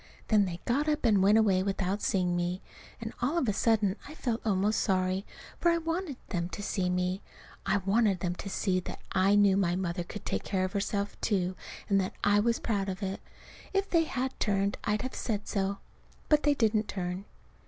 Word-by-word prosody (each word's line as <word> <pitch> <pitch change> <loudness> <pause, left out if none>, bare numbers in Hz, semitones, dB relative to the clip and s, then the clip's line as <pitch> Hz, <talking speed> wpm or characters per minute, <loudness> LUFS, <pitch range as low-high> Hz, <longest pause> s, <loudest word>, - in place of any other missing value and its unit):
Then 210 -2 +5
they 175 -2 -5
got 285 +6 +1
up 300 -3 0
and 210 -4 +4
went 205 +3 +6
away 200 -4 +4
without 195 0 -1
seeing 180 -2 +1
me. 175 +1 -1 0.4
And 225 -1 -5
all 280 +8 +1
of 275 - +1
a 210 - +2
sudden 210 -2 +2
I 300 - -9
felt 240 -6 -2
almost 205 0 +2
sorry, 185 -1 0 0.3
for 345 - +4
I 335 - +3
wanted 330 -3 -3
them 175 -3 -2
to 205 - -6
see 190 -3 0
me. 180 +1 0 0.5
I 195 +1 +3
wanted 200 -2 +3
them 180 -1 0
to 195 - -6
see 190 -1 0
that 180 - -7
I 195 +2 +4
knew 200 -2 +5
my 175 -3 +2
mother 175 -1 -2
could 205 +4 -9
take - - -2
care 185 -2 0
of 185 - -5
herself, 200 0 -2
too, 185 -4 0 0.3
and 195 -1 +3
that 185 - -3
I 205 0 +4
was 230 +2 +2
proud 200 -4 -1
of 190 +2 -5
it. 195 0 -3 0.5
If 390 0 0
they 330 -2 +4
had 265 -3 -2
turned 200 -1 +1
I'd 210 +2 0
have 255 - -4
said 210 -4 -3
so. 195 0 -1 0.5
But 300 -1 +5
they 290 -1 +3
didn't 220 -3 +2
turn. 185 0 -4
200 Hz, 205 wpm, -30 LUFS, 185-225 Hz, 0.5 s, went